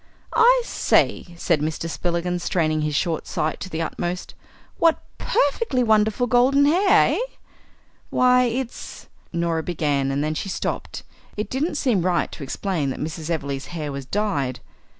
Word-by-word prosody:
"I -, -, +5 dB
say," 175 Hz, -, +1 dB
said 165 Hz, -3 st, +1 dB
Mr. 160 Hz, +2 st, -2 dB
Spillikins, 175 Hz, +1 st, -2 dB
straining 155 Hz, -3 st, 0 dB
his 150 Hz, -1 st, -1 dB
short 165 Hz, +1 st, -1 dB
sight 155 Hz, -, -2 dB
to 185 Hz, -, -6 dB
the 165 Hz, -1 st, -2 dB
uttermost, 175 Hz, +2 st, -4 dB, 0.5 s
"what 330 Hz, -1 st, +3 dB, 0.2 s
perfectly 280 Hz, -, +1 dB
wonderful 220 Hz, +1 st, +3 dB
golden 255 Hz, +3 st, +4 dB
hair, 385 Hz, +7 st, +4 dB
eh?" -, -, -2 dB, 0.9 s
"Why, 250 Hz, 0 st, +4 dB
it's 245 Hz, +1 st, -5 dB
" -, -, -35 dB
Norah 170 Hz, -1 st, 0 dB
began, 145 Hz, -5 st, 0 dB
and 140 Hz, +1 st, 0 dB
then 155 Hz, +1 st, -1 dB
she 195 Hz, -, -4 dB
stopped. -, -, -4 dB, 0.3 s
It 210 Hz, -1 st, -3 dB
didn't 300 Hz, +5 st, -1 dB
seem 245 Hz, -10 st, +1 dB
right 175 Hz, 0 st, +1 dB
to -, -, -9 dB
explain 155 Hz, +1 st, -2 dB
that 130 Hz, -, -4 dB
Mrs. 155 Hz, +1 st, -5 dB
Everleigh's 140 Hz, -4 st, -3 dB
hair 150 Hz, -2 st, -3 dB
was 140 Hz, -1 st, -6 dB
dyed. 140 Hz, -, -1 dB
175 Hz, 155 wpm, -23 LUFS, 155-245 Hz, 0.9 s, I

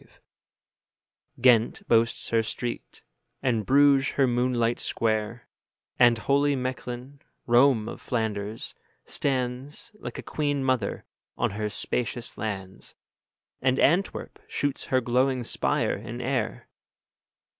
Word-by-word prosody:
Ghent 120 Hz, -2 st, +4 dB
boasts 115 Hz, 0 st, +2 dB
her 115 Hz, -1 st, +3 dB
street, 110 Hz, -, -5 dB, 0.4 s
and 115 Hz, -5 st, 0 dB
Bruges 140 Hz, 0 st, +5 dB
her 135 Hz, -, +3 dB
moonlight 120 Hz, -1 st, +1 dB
square; 110 Hz, +1 st, -1 dB, 0.5 s
And 120 Hz, -2 st, +6 dB
holy 140 Hz, +4 st, +2 dB
Mechlin, 130 Hz, +1 st, -5 dB, 0.3 s
Rome 120 Hz, -2 st, +4 dB
of -, -, -7 dB
Flanders, 110 Hz, -2 st, -3 dB, 0.3 s
stands, 130 Hz, -, -2 dB
Like 210 Hz, -, -8 dB
a -, -, -6 dB
queen 145 Hz, -2 st, -1 dB
mother, 130 Hz, -6 st, 0 dB, 0.3 s
on -, -, +1 dB
her 105 Hz, +1 st, -2 dB
spacious 120 Hz, +3 st, -2 dB
lands; 95 Hz, -3 st, -5 dB, 0.7 s
And 130 Hz, 0 st, +2 dB
Antwerp 175 Hz, +7 st, +1 dB
shoots 145 Hz, -1 st, -2 dB
her 130 Hz, -1 st, +2 dB
glowing 125 Hz, +1 st, +1 dB
spire -, -, 0 dB
in 120 Hz, +4 st, -7 dB
air. 125 Hz, -2 st, -2 dB
125 Hz, 110 wpm, -26 LUFS, 115-135 Hz, 0.7 s, And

